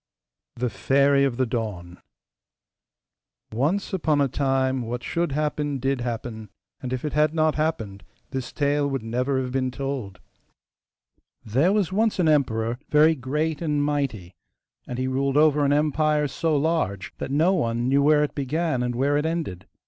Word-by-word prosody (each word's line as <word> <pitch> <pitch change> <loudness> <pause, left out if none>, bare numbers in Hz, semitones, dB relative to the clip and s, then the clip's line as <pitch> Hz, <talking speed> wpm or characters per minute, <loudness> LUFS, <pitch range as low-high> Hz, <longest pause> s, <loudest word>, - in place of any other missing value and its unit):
THE 125 -1 -2
FAIRY 140 +7 +3
OF 125 -4 -1
THE 130 - +2
DAWN 105 -7 -4 1.5
Once 155 - 0
upon 155 -5 +1
a 140 - +3
time 130 -1 0
what 120 +1 -4
should 170 -2 -1
happen 150 -1 -1
DID 135 0 -1
happen; 115 -2 -5 0.3
and 125 - -5
if 130 +2 -3
it 150 - -3
had 150 +1 +2
not 155 -1 +3
happened 115 -11 -2 0.3
this 130 -2 -4
tale 145 0 +1
would 135 -4 -3
never 125 +4 -1
have 130 -1 -3
been 130 0 0
told. 130 -6 -5 1.3
There 135 - +2
was 200 -3 +1
once 220 +2 +1
an 180 -3 +2
emperor, 120 -6 +1
very 155 +2 +5
great 150 +3 -2
and 150 -3 0
mighty, 135 -12 -2 0.5
and 125 - -5
he 130 0 -1
ruled 135 +1 0
over 150 -1 +4
an 140 - +2
empire 150 0 +2
so 160 +2 0
large 140 - -1
that - - -4
no 160 +7 +3
one 120 -8 0
knew 140 +2 +3
where 150 +1 +4
it 150 - -2
began 145 0 -1
and 125 -1 -2
where 140 +3 +2
it 150 - 0
ended. 155 - -4
140 Hz, 165 wpm, -24 LUFS, 125-150 Hz, 1.5 s, very